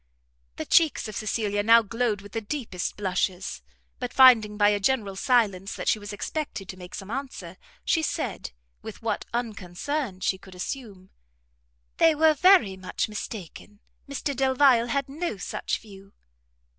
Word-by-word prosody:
The - - -5
cheeks 320 -8 +3
of 215 - -8
Cecilia 210 -1 -1
now 230 +2 +6
glowed 225 -1 -1
with 205 0 -13
the 225 - -3
deepest 210 -6 -4
blushes; 190 -1 -2 0.4
but 250 -1 -4
finding 225 -6 +6
by 205 -1 +5
a 205 -1 +1
general 205 -2 0
silence 205 -4 +1
that - - -6
she 215 - +3
was 205 0 -8
expected 210 -1 -4
to - - -6
make 180 -1 -10
some 195 +2 -8
answer, 270 +1 -6 0.3
she 325 - +2
said, 315 - -3 0.3
with - - -10
what - - -2
unconcern 225 - -3
she 190 - 0
could 190 -1 -14
assume, 195 -2 -7 0.9
"They 325 -1 +5
were 315 +1 +5
very 330 - +5
much 185 +3 -3
mistaken; 210 -1 -8 0.3
Mr 280 0 -3
Delvile 260 -2 +4
had 275 +3 -1
no 300 - -4
such 180 - -3
view." 195 -2 -15
215 Hz, 155 wpm, -26 LUFS, 195-265 Hz, 0.9 s, now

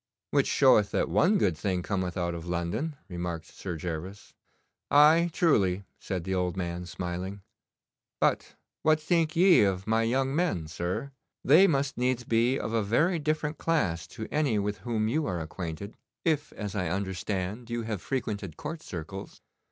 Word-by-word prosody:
'Which - - +3
showeth - - +5
that - - 0
one 210 - +4
good 90 - +2
thing 90 +2 -1
cometh 95 -3 -2
out 85 -1 -1
of 85 0 -7
London,' 90 - -2
remarked 85 -3 -4
Sir 90 -4 -6
Gervas. 90 +4 -6 0.6
'Aye, 155 +4 +6
truly,' 100 - +2 0.2
said 95 -3 -3
the 95 +2 -2
old 90 0 -1
man, 90 -1 -3
smiling. 90 +3 -5 0.8
'But - - +1 0.3
what 155 0 +4
think 160 0 +1
ye 180 +1 +6
of 95 -2 +1
my 110 +1 +2
young 130 +4 +1
men, 160 - 0
sir? 85 - -3 0.3
They 165 +9 +7
must 140 -6 0
needs 125 0 +1
be 120 +3 +2
of 110 - -4
a 115 - +2
very 160 - +2
different 155 0 -1
class 90 - 0
to 110 - -4
any 145 -8 +1
with 105 0 -1
whom 110 -3 -1
you 150 +7 0
are 90 -3 -2
acquainted, 85 +4 -6 0.3
if, 150 -3 +1
as 105 -2 -5
I 90 -5 -1
understand, 95 +4 -3
you 120 0 -2
have 110 -4 -4
frequented 100 - -3
court 155 +2 -5
circles. 95 - -7
105 Hz, 165 wpm, -28 LUFS, 90-145 Hz, 0.8 s, They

